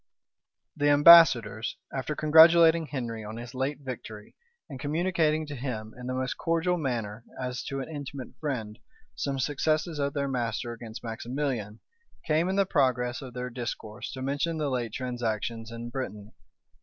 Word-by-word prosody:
The 145 Hz, 0 st, +2 dB
ambassadors, 145 Hz, -8 st, +7 dB, 0.2 s
after 135 Hz, +3 st, -3 dB
congratulating 160 Hz, +1 st, +6 dB
Henry 115 Hz, -6 st, -4 dB
on 110 Hz, +2 st, -7 dB
his 120 Hz, 0 st, -8 dB
late 135 Hz, +2 st, -2 dB
victory, 110 Hz, -5 st, -8 dB, 0.3 s
and 135 Hz, -, -8 dB
communicating 155 Hz, +1 st, +1 dB
to 145 Hz, -1 st, -7 dB
him, 115 Hz, -5 st, -5 dB
in 125 Hz, 0 st, -8 dB
the 130 Hz, -, -2 dB
most 130 Hz, 0 st, -2 dB
cordial 165 Hz, +2 st, +1 dB
manner, 115 Hz, -8 st, -3 dB, 0.2 s
as 125 Hz, -1 st, -3 dB
to 135 Hz, 0 st, -3 dB
an -, -, -6 dB
intimate 140 Hz, -4 st, -7 dB
friend, 115 Hz, -7 st, -4 dB, 0.3 s
some 135 Hz, +5 st, -2 dB
successes 155 Hz, +3 st, 0 dB
of 140 Hz, 0 st, 0 dB
their 140 Hz, -1 st, 0 dB
master 120 Hz, -2 st, -2 dB
against 115 Hz, -1 st, -9 dB
Maximilian, 115 Hz, -1 st, -3 dB, 0.4 s
came 160 Hz, +3 st, +2 dB
in 190 Hz, -, 0 dB
the 200 Hz, 0 st, +3 dB
progress 130 Hz, -7 st, +1 dB
of 130 Hz, -3 st, -9 dB
their 125 Hz, 0 st, -4 dB
discourse 115 Hz, -3 st, -6 dB
to 130 Hz, -, -6 dB
mention 145 Hz, +5 st, -1 dB
the 150 Hz, -3 st, -1 dB
late 120 Hz, -3 st, -2 dB
transactions 115 Hz, -2 st, -3 dB
in 115 Hz, +1 st, -7 dB
Brittany. 105 Hz, -5 st, -6 dB
130 Hz, 155 wpm, -28 LUFS, 115-150 Hz, 0.4 s, ambassadors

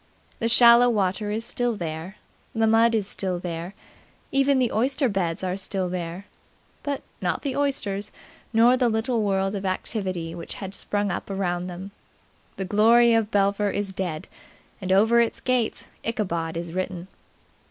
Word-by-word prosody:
The 230 Hz, -, 0 dB
shallow 235 Hz, +1 st, +7 dB
water 205 Hz, -1 st, 0 dB
is 220 Hz, +2 st, -2 dB
still 245 Hz, -2 st, -1 dB
there; 170 Hz, +1 st, -5 dB, 0.4 s
the 225 Hz, 0 st, +3 dB
mud 225 Hz, +1 st, +4 dB
is 210 Hz, -3 st, 0 dB
still 185 Hz, -3 st, -2 dB
there; 175 Hz, +1 st, -5 dB, 0.6 s
even 275 Hz, 0 st, +3 dB
the 250 Hz, -2 st, +2 dB
oyster 260 Hz, +4 st, +1 dB
beds 190 Hz, -5 st, -2 dB
are 185 Hz, 0 st, -1 dB
still 190 Hz, -1 st, -2 dB
there; 175 Hz, +1 st, -5 dB, 0.6 s
but 285 Hz, -1 st, -3 dB, 0.2 s
not -, -, -1 dB
the 275 Hz, -3 st, -2 dB
oysters 210 Hz, -8 st, -1 dB, 0.4 s
nor 235 Hz, +2 st, +5 dB
the 250 Hz, -2 st, +2 dB
little 225 Hz, +1 st, 0 dB
world 195 Hz, -1 st, 0 dB
of 200 Hz, -1 st, -4 dB
activity 185 Hz, -3 st, -3 dB
which 170 Hz, -1 st, -6 dB
had 195 Hz, -1 st, -7 dB
sprung 205 Hz, 0 st, -1 dB
up -, -, -4 dB
around 180 Hz, -2 st, -2 dB
them. 185 Hz, +2 st, -7 dB, 0.6 s
The 195 Hz, -, -4 dB
glory 230 Hz, +4 st, +5 dB
of 225 Hz, -2 st, +2 dB
Belpher 200 Hz, 0 st, +2 dB
is 200 Hz, -1 st, -3 dB
dead; 175 Hz, -5 st, -4 dB, 0.5 s
and 185 Hz, 0 st, -2 dB
over 225 Hz, +5 st, +5 dB
its 230 Hz, -, -1 dB
gates 250 Hz, -3 st, -1 dB, 0.2 s
Ichabod 170 Hz, -8 st, -2 dB
is 170 Hz, -1 st, -5 dB
written. 185 Hz, -1 st, -3 dB
200 Hz, 160 wpm, -25 LUFS, 185-230 Hz, 0.6 s, shallow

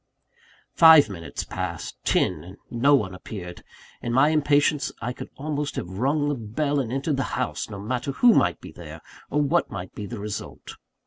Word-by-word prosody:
Five 160 Hz, -6 st, +8 dB
minutes 85 Hz, -4 st, -6 dB
passed -, -, -5 dB
ten 80 Hz, -5 st, +1 dB
and 95 Hz, +3 st, -12 dB
no 140 Hz, +5 st, +4 dB
one 105 Hz, -8 st, -1 dB
appeared. 90 Hz, -2 st, -8 dB, 0.4 s
In 120 Hz, -, -3 dB
my 135 Hz, +4 st, +5 dB
impatience, 145 Hz, -1 st, +2 dB
I 125 Hz, -, -3 dB
could -, -, -9 dB
almost 145 Hz, 0 st, -3 dB
have 95 Hz, +3 st, -5 dB
rung 145 Hz, +4 st, +1 dB
the 145 Hz, -, +1 dB
bell 140 Hz, +5 st, -1 dB
and 120 Hz, -4 st, -2 dB
entered 135 Hz, +2 st, -1 dB
the -, -, 0 dB, 0.2 s
house, 125 Hz, -3 st, -2 dB
no 100 Hz, -, -7 dB
matter 125 Hz, +7 st, -3 dB
who 240 Hz, -, +5 dB
might -, -, +2 dB
be -, -, -11 dB
there, -, -, -10 dB, 0.3 s
or 150 Hz, 0 st, +1 dB
what 140 Hz, -, +1 dB
might 95 Hz, -2 st, -7 dB
be 105 Hz, -, -6 dB
the 120 Hz, -, -6 dB
result. 105 Hz, 0 st, -6 dB
130 Hz, 185 wpm, -25 LUFS, 105-145 Hz, 0.4 s, Five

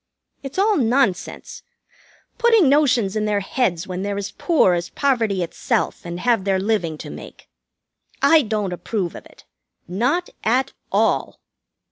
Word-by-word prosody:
It's 270 Hz, +3 st, -8 dB
all 415 Hz, +2 st, +3 dB
nonsense, 240 Hz, -, 0 dB, 0.8 s
putting 455 Hz, -, +5 dB
notions 255 Hz, -8 st, +3 dB
in 215 Hz, 0 st, 0 dB
their 205 Hz, -1 st, 0 dB
heads 190 Hz, -5 st, -1 dB
when 185 Hz, 0 st, -5 dB
they're 200 Hz, 0 st, -3 dB
as 200 Hz, 0 st, -4 dB
poor 310 Hz, -, +2 dB
as 175 Hz, 0 st, -2 dB
poverty 225 Hz, -9 st, 0 dB
itself 170 Hz, -, -2 dB
and 175 Hz, +1 st, -5 dB
have 235 Hz, -5 st, +2 dB
their 195 Hz, -1 st, +1 dB
living 185 Hz, -6 st, -1 dB
to -, -, -8 dB
make. -, -, -11 dB, 0.7 s
I 325 Hz, -1 st, +5 dB
don't 210 Hz, -6 st, -2 dB
approve 180 Hz, -1 st, -3 dB
of -, -, -11 dB
it. -, -, -21 dB, 0.4 s
Not 250 Hz, -, -1 dB
at 260 Hz, +4 st, +1 dB, 0.2 s
all." -, -, +1 dB
215 Hz, 145 wpm, -21 LUFS, 190-270 Hz, 0.8 s, putting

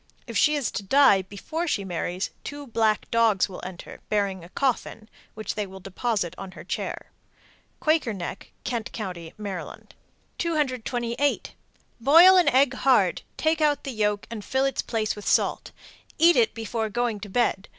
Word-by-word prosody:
If -, -, -8 dB
she 300 Hz, 0 st, +4 dB
is 280 Hz, -6 st, -1 dB
to -, -, -3 dB
die 200 Hz, -1 st, +5 dB
before 205 Hz, -, -5 dB
she 200 Hz, -10 st, -1 dB
marries, 180 Hz, +1 st, -3 dB
two 290 Hz, 0 st, -7 dB
black 220 Hz, -3 st, 0 dB
dogs 225 Hz, -4 st, +3 dB
will 190 Hz, -, -9 dB
enter, 180 Hz, -1 st, -9 dB
bearing 200 Hz, -4 st, 0 dB
a 170 Hz, -, -12 dB
coffin, 235 Hz, -3 st, -2 dB, 0.3 s
which 215 Hz, -2 st, -4 dB
they 210 Hz, -2 st, -3 dB
will 190 Hz, 0 st, -10 dB
deposit 195 Hz, -1 st, -2 dB
on 190 Hz, -1 st, -8 dB
her -, -, -10 dB
chair. -, -, -5 dB, 0.7 s
Quaker 310 Hz, -7 st, +2 dB
Neck, 190 Hz, -1 st, -6 dB
Kent 235 Hz, -3 st, -3 dB
Co., 200 Hz, -5 st, -4 dB
Md. 180 Hz, +3 st, -8 dB, 0.5 s
228. 260 Hz, -4 st, -1 dB, 0.5 s
Boil 330 Hz, +10 st, +8 dB
an 360 Hz, -2 st, +5 dB
egg 265 Hz, 0 st, +4 dB
hard, 250 Hz, -9 st, +3 dB, 0.2 s
take 315 Hz, 0 st, +1 dB
out 295 Hz, -1 st, +2 dB
the 270 Hz, -, -4 dB
yolk, 210 Hz, -3 st, 0 dB
and 220 Hz, -3 st, -6 dB
fill 265 Hz, +4 st, 0 dB
its 270 Hz, -2 st, 0 dB
place 220 Hz, -2 st, -2 dB
with 210 Hz, -, -9 dB
salt. -, -, +1 dB, 0.5 s
Eat 335 Hz, +2 st, +6 dB
it 455 Hz, -, +3 dB
before 225 Hz, 0 st, -3 dB
going 235 Hz, 0 st, -1 dB
to 205 Hz, 0 st, -8 dB
bed. 205 Hz, -2 st, 0 dB
225 Hz, 165 wpm, -25 LUFS, 200-275 Hz, 0.7 s, Boil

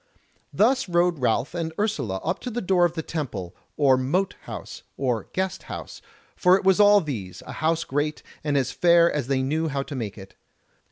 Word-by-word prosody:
Thus 250 Hz, -1 st, +2 dB
rode 175 Hz, -2 st, +2 dB
Ralph 125 Hz, +3 st, 0 dB
and 165 Hz, -2 st, -3 dB
Ursula 150 Hz, -, -1 dB
up -, -, -1 dB
to 250 Hz, -, -5 dB
the 240 Hz, 0 st, -3 dB
door 185 Hz, -4 st, +3 dB
of 170 Hz, -, 0 dB
the 160 Hz, -2 st, -4 dB
Temple, 110 Hz, -, -5 dB, 0.2 s
or 135 Hz, -3 st, +5 dB
Mote 175 Hz, +10 st, 0 dB
house, -, -, -8 dB, 0.2 s
or 125 Hz, -5 st, -1 dB
Guest 190 Hz, 0 st, -2 dB
house, -, -, -7 dB, 0.3 s
for 180 Hz, 0 st, +5 dB
it -, -, -6 dB
was 190 Hz, +1 st, +4 dB
all 205 Hz, 0 st, +7 dB
these, 110 Hz, -, -6 dB
a -, -, -8 dB
house 165 Hz, +1 st, 0 dB
great, 145 Hz, +2 st, -2 dB, 0.2 s
and 145 Hz, -2 st, +1 dB
as 130 Hz, -2 st, 0 dB
fair 170 Hz, -1 st, +4 dB
as 145 Hz, -5 st, -2 dB
they 135 Hz, -1 st, +1 dB
knew 155 Hz, +4 st, 0 dB
how 140 Hz, -2 st, -2 dB
to 140 Hz, -, -7 dB
make 110 Hz, -5 st, -4 dB
it. 95 Hz, -1 st, -11 dB
155 Hz, 200 wpm, -25 LUFS, 130-180 Hz, 0.3 s, all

